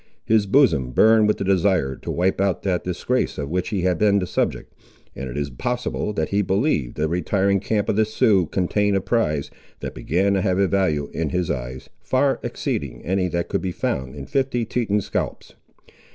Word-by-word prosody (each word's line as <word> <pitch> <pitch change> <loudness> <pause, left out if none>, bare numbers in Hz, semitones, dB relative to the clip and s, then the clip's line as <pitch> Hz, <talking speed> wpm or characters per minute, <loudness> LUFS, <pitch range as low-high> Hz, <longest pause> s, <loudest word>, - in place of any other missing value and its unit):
His 110 -2 +3
bosom 80 - +3
burned 110 - +5
with 105 - +2
the - - -3
desire 95 -7 +2
to - - -8
wipe 95 +2 +1
out 100 -4 0
that 90 -3 0
disgrace 90 +8 -1
of 70 0 -4
which 90 0 -1
he 100 -4 -1
had 90 0 +1
been 105 -1 +4
the 95 - 0
subject; - - -2 0.4
and 65 0 -5
it - - -6
is 70 -1 -2
possible, 120 - -2
that 80 -5 -1
he 100 +1 +1
believed 95 - 0
the 75 +1 +1
retiring 95 +4 +1
camp 105 +1 -1
of - - +1
the 110 - +5
Siouxes 110 - +2
contained 100 +2 +1
a - - -1
prize, 75 -11 0 0.3
that - - -5
began 95 +6 0
to 95 - +1
have 95 -2 +1
a 100 0 +3
value 80 -7 0
in 80 -2 -1
his 90 0 -1
eyes, 65 0 -5
far 135 +1 +1
exceeding - - -4
any 95 +2 +1
that 85 -1 -2
could - - -1
be 95 - -2
found 65 -5 -3
in 70 -2 -7
fifty 130 - 0
Teton 105 -3 0
scalps. - - -4
95 Hz, 200 wpm, -22 LUFS, 80-105 Hz, 0.4 s, burned